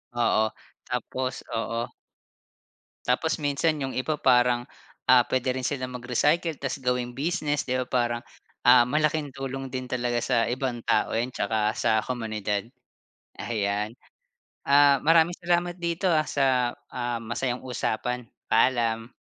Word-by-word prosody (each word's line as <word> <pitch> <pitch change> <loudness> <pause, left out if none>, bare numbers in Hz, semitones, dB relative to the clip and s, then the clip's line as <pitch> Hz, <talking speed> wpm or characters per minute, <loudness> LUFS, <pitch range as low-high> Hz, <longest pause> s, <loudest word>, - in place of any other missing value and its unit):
Oo, 115 -2 +3 0.4
tapos 130 0 -3
oo. 115 +1 -3 1.1
Tapos 145 +6 +1
minsan 150 +2 +1
yung 135 - -3
iba 150 +4 -1
parang, 125 -2 +3 0.5
ah, 125 -2 +6
puwede 130 0 0
rin 130 -1 -1
silang 130 -3 -3
mag-recycle 150 +7 +1
tas 135 +1 -4
gawing 125 -1 -1
business, 150 0 -1
di 125 - 0
ba? 130 0 0
Parang, 120 -2 0 0.4
ah, 125 0 +7
malaking 150 0 0
tulong 135 0 -4
din 130 0 -5
talaga 120 -1 0
sa 120 -3 +2
ibang 125 0 -2
tao 105 - +2
'yan 115 +3 0
tsaka 110 -1 0
sa 110 -1 +2
komunidad. 110 -4 -2 0.8
Ayan, 105 -1 -1 0.8
ah, 140 0 +6
maraming 165 +2 +4
salamat 175 0 0
dito, 170 +2 -1
ah, 155 -2 +3
sa, 130 -3 +2 0.2
ah, 120 -1 -2
masayang 120 +2 -2
usapan, 125 0 -2 0.3
paalam. 115 0 +2
125 Hz, 130 wpm, -26 LUFS, 120-145 Hz, 1.1 s, ah